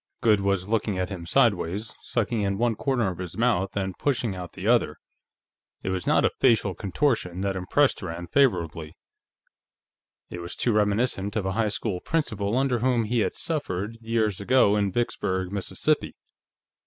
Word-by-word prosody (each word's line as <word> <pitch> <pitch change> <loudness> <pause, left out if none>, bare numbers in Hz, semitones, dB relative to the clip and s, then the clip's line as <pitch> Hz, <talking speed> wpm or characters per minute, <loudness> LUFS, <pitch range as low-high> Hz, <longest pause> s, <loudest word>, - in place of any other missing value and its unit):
Goode 105 -3 +4
was 100 -1 0
looking 105 -2 0
at 90 0 -1
him 90 -4 -7
sideways, 105 -3 +1
sucking 115 -1 -1
in 100 -1 0
one 120 +1 +2
corner 120 -4 0
of 90 - -9
his 90 0 -6
mouth 100 -5 +1
and 95 -2 -2
pushing 120 -8 0
out 90 -2 -7
the - - -5
other. - - +3 0.9
It - - -2
was 95 -1 -3
not - - +4
a - - +3
facial 115 -6 +3
contortion 95 - -1
that 100 -1 -1
impressed 130 +10 +2
Rand 85 -1 -6
favorably; 85 - +1 1.3
it 90 - -6
was 85 0 -6
too 120 - +1
reminiscent 105 -1 +1
of 105 -4 -1
a 95 - 0
high 110 +2 +1
school 100 -3 -2
principal 110 -9 -1
under 130 -2 +1
whom 120 -1 +2
he 115 +2 0
had - - 0
suffered, 115 - -3
years 110 -4 0
ago, 105 -1 +4
in 100 -2 +1
Vicksburg, 95 -5 -1
Mississippi. 100 -2 -1
100 Hz, 165 wpm, -26 LUFS, 95-115 Hz, 1.3 s, Goode